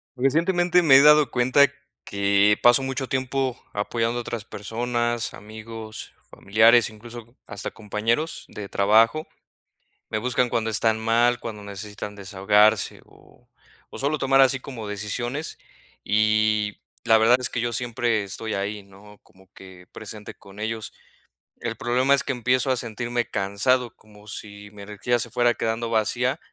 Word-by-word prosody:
Recientemente, 175 Hz, +7 st, +2 dB
me 135 Hz, -5 st, +7 dB
he -, -, +7 dB
dado 150 Hz, 0 st, +6 dB
cuenta 130 Hz, +3 st, +4 dB, 0.4 s
que 100 Hz, +1 st, +2 dB
paso 120 Hz, +2 st, +5 dB
mucho 135 Hz, 0 st, -3 dB
tiempo 130 Hz, -1 st, -2 dB
apoyando 115 Hz, +3 st, -1 dB
a -, -, -2 dB
otras 115 Hz, -2 st, -6 dB
personas, 120 Hz, +2 st, -3 dB
amigos, 110 Hz, +1 st, -9 dB, 0.2 s
familiares, 110 Hz, +2 st, +4 dB
incluso 115 Hz, +2 st, -12 dB
hasta -, -, -5 dB
compañeros 115 Hz, +8 st, -2 dB
de 100 Hz, -2 st, -9 dB
trabajo. 115 Hz, +9 st, +3 dB, 0.8 s
Me 110 Hz, -, -2 dB
buscan 125 Hz, 0 st, 0 dB
cuando 115 Hz, -1 st, -1 dB
están 110 Hz, +1 st, +1 dB
mal, 120 Hz, +2 st, +2 dB
cuando 105 Hz, -3 st, -7 dB
necesitan 105 Hz, +1 st, -8 dB
desahogarse 105 Hz, +2 st, +2 dB
o -, -, -23 dB, 0.5 s
o -, -, -7 dB
sólo 145 Hz, +3 st, 0 dB
tomar 135 Hz, -1 st, +3 dB
así 130 Hz, 0 st, +4 dB
como 125 Hz, -5 st, -8 dB
decisiones, 120 Hz, +8 st, -4 dB, 0.4 s
y 110 Hz, 0 st, +1 dB, 0.3 s
la 110 Hz, -2 st, +5 dB
verdad 115 Hz, +3 st, +5 dB
es 125 Hz, -, -2 dB
que 115 Hz, -, -2 dB
yo 120 Hz, 0 st, -1 dB
siempre 120 Hz, -2 st, -1 dB
estoy 110 Hz, +3 st, -5 dB
ahí, 100 Hz, +1 st, -3 dB
¿no? 100 Hz, +1 st, -17 dB
Como 95 Hz, 0 st, -23 dB
que 95 Hz, -1 st, -14 dB
presente 105 Hz, -1 st, -9 dB
con 100 Hz, +1 st, -16 dB
ellos. 110 Hz, 0 st, -4 dB, 0.7 s
El -, -, -4 dB
problema 125 Hz, +3 st, +2 dB
es 140 Hz, -, -1 dB
que -, -, -2 dB
empiezo 125 Hz, +1 st, +1 dB
a 130 Hz, -, +1 dB
sentirme 120 Hz, +1 st, -3 dB
cansado, 110 Hz, +5 st, 0 dB
como 105 Hz, -1 st, -19 dB
si 100 Hz, -1 st, -9 dB
mi 105 Hz, -1 st, -13 dB
energía 105 Hz, +4 st, -2 dB
se -, -, -2 dB
fuera 120 Hz, -1 st, +2 dB
quedando 115 Hz, +1 st, -2 dB
vacía. 120 Hz, +5 st, 0 dB
115 Hz, 150 wpm, -24 LUFS, 105-125 Hz, 0.8 s, me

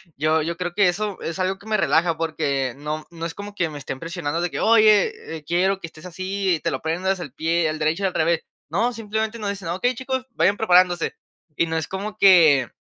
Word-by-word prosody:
yo 155 Hz, +2 st, +2 dB
yo 170 Hz, +1 st, -3 dB
creo 180 Hz, -1 st, -3 dB
que 200 Hz, -3 st, +4 dB
eso 205 Hz, +2 st, -3 dB
es 165 Hz, +3 st, -5 dB
algo 185 Hz, +1 st, 0 dB
que 210 Hz, -, -15 dB
me 215 Hz, -1 st, +1 dB
relaja 165 Hz, -2 st, +2 dB
porque 140 Hz, -6 st, -1 dB
no 150 Hz, +1 st, -5 dB
no 165 Hz, -1 st, -7 dB
es 165 Hz, -, -4 dB
como 205 Hz, 0 st, -9 dB
que 170 Hz, -4 st, 0 dB
me 150 Hz, -1 st, -8 dB
estén 135 Hz, -1 st, -6 dB
presionando 165 Hz, -1 st, -3 dB
de 175 Hz, -, -2 dB
que: -, -, -4 dB
"Oye, 215 Hz, -7 st, +3 dB
eh, 150 Hz, -, -13 dB
quiero 185 Hz, +4 st, +1 dB
que 165 Hz, -, -7 dB
estés 160 Hz, +2 st, -14 dB
así 185 Hz, +1 st, -1 dB
y -, -, -5 dB
te -, -, -2 dB
lo -, -, -1 dB
aprendas 185 Hz, +4 st, -1 dB
al 145 Hz, -7 st, -7 dB
pie, 165 Hz, +2 st, +1 dB
al 155 Hz, 0 st, -4 dB
derecho 160 Hz, +5 st, 0 dB
y -, -, +3 dB
al 185 Hz, -, -4 dB
revés". 165 Hz, +1 st, +1 dB, 0.3 s
No, 230 Hz, +10 st, 0 dB
simplemente 220 Hz, +1 st, -3 dB
nos 205 Hz, -2 st, -3 dB
dicen: 200 Hz, -4 st, -5 dB
"Okey, 245 Hz, +9 st, 0 dB
chicos, 260 Hz, +1 st, -3 dB
vayan 205 Hz, -2 st, +2 dB
preparándose", 180 Hz, -4 st, +3 dB, 0.4 s
y 170 Hz, -, +3 dB
no 160 Hz, 0 st, -1 dB
es 160 Hz, -, -2 dB
como 205 Hz, +3 st, -5 dB
que 170 Hz, -9 st, +6 dB
175 Hz, 240 wpm, -23 LUFS, 160-200 Hz, 0.4 s, que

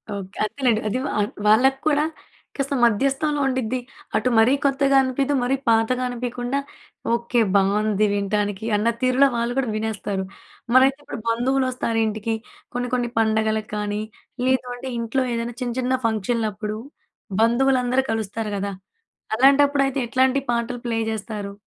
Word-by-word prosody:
Okay. 195 Hz, 0 st, -8 dB
అంతేనండి 230 Hz, 0 st, +1 dB
అది 215 Hz, -, -1 dB
వా -, -, -3 dB, 0.3 s
వాళ్ళకూడా 270 Hz, +7 st, +4 dB, 0.5 s
కాస్త 275 Hz, 0 st, -1 dB
మధ్యస్థంలో 275 Hz, +6 st, +2 dB
ఉండిద్ది. 255 Hz, -2 st, -1 dB, 0.4 s
అటు 220 Hz, -, +2 dB
మరీ 225 Hz, +4 st, +5 dB
కొత్తగా 275 Hz, 0 st, +2 dB
అనిపిదు, 265 Hz, +2 st, 0 dB
మరీ 250 Hz, +2 st, +1 dB
పాతగా 230 Hz, +3 st, +2 dB
అనిపియకుండా, 245 Hz, +2 st, -3 dB, 0.5 s
ఓకే 235 Hz, 0 st, +1 dB
బావుంది 205 Hz, +1 st, +2 dB
వినటానికి, 205 Hz, +1 st, -1 dB
అన్న 210 Hz, +2 st, +1 dB
తీరులో 255 Hz, +2 st, +4 dB
వాళ్ళు 235 Hz, +1 st, -1 dB
కూడా 265 Hz, -3 st, +1 dB
వినేస్తారు. 210 Hz, -3 st, -2 dB, 0.5 s
మరైతే 265 Hz, +1 st, +6 dB
ఇప్పుడు -, -, -7 dB
బంధువులొస్తారు 250 Hz, -1 st, 0 dB
ఇంటికి 220 Hz, +1 st, -2 dB, 0.4 s
కొన్ని, 245 Hz, 0 st, -2 dB
కొన్ని 245 Hz, -1 st, 0 dB
పండగలకు 220 Hz, -1 st, +1 dB
కానీ, 210 Hz, 0 st, -2 dB, 0.4 s
లేదంటే 255 Hz, 0 st, -1 dB
ఇంట్లో 230 Hz, +3 st, 0 dB
ఏదైనా 230 Hz, 0 st, -3 dB
చిన్న, 245 Hz, -1 st, -2 dB
చిన్న 255 Hz, 0 st, 0 dB
ఫంక్షన్‍లప్పుడు 215 Hz, -1 st, -2 dB, 0.6 s
బంధువులందరూ 255 Hz, +2 st, +3 dB
కలుస్తారు 220 Hz, 0 st, -3 dB
కదా! 200 Hz, 0 st, -3 dB, 0.6 s
అలాంటప్పుడు 280 Hz, +2 st, +5 dB
అయితే, 270 Hz, +1 st, -3 dB
ఎట్లాంటి 260 Hz, +2 st, +2 dB
పాటలు 235 Hz, +1 st, -2 dB
ప్లే 230 Hz, -1 st, 0 dB
జేస్తారు? 210 Hz, -2 st, -5 dB
235 Hz, 125 wpm, -23 LUFS, 220-260 Hz, 0.6 s, మరైతే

